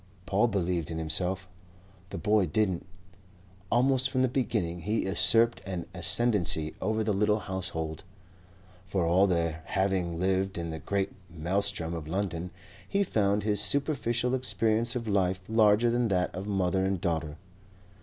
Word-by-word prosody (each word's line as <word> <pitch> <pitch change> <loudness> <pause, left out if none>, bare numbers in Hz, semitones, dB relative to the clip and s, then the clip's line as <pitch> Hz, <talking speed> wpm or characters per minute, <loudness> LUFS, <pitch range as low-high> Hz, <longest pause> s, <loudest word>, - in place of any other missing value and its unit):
Paul 100 +4 +2
believed 90 -6 -1
in 80 - -4
himself; 90 +4 0 0.6
the - - -5
boy 105 -3 +2
didn't. 95 +1 0 0.8
Almost 130 +2 +3
from 130 -1 +1
the - - +4
beginning 100 -9 -1
he 105 +6 -1
usurped 115 +4 +2
an 90 -3 -5
ascendancy 90 -3 +1
over 110 +3 0
the 105 -1 0
little 105 +2 +2
household. 90 -5 -4 0.8
For 95 -2 0
all 90 +4 +4
their 85 -3 -1
having 95 -3 -1
lived 95 +1 0
in 85 -1 -3
the 80 - -5
great 100 +2 -1 0.2
maelstrom 85 0 -1
of 80 -3 -5
London, 90 -1 -2 0.4
he 200 0 +2
found 105 - +1
his 105 -1 +1
superficial 125 +1 +1
experience 115 -2 +1
of 115 -2 -3
life 95 -2 +1
larger 110 +1 +4
than 120 0 +1
that 90 -3 0
of 95 +3 -6
mother 95 -2 +1
and 95 -1 0
daughter. 80 -4 -2
95 Hz, 145 wpm, -29 LUFS, 85-110 Hz, 0.8 s, the